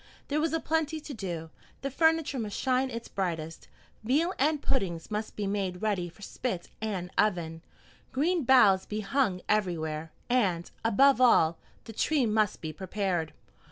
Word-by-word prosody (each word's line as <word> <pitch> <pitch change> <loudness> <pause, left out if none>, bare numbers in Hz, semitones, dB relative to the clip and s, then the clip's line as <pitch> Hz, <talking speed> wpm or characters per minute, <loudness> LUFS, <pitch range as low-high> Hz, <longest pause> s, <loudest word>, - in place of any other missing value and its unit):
There 300 +1 +1
was 325 - +1
a 325 - +1
plenty 320 -1 -1
to 295 -1 -8
do. 170 -7 -5 0.3
The 275 - -2
furniture 320 -2 +2
must 210 -3 -4
shine 260 0 +1
its 235 -1 -6
brightest, 165 -4 -4 0.4
veal 305 - +2
and 300 +2 +2
puddings 185 -11 -2
must 215 +1 -3
be 210 - -2
made 195 -2 -2
ready 195 -5 0
for 200 +5 -15
spit 195 -5 -4
and 190 -5 -3
oven, 170 -6 +1 0.5
green 320 +5 +1
boughs 210 -7 +5
be 215 +1 -3
hung 200 -3 0
everywhere, 160 -6 -1 0.2
and, 195 -9 +1
above 260 +4 +5
all, 165 -10 +5 0.2
the 225 - -9
tree 285 +3 +2
must 215 -2 +1
be 155 -1 -5
prepared. 185 -2 -2
210 Hz, 160 wpm, -29 LUFS, 180-265 Hz, 0.5 s, boughs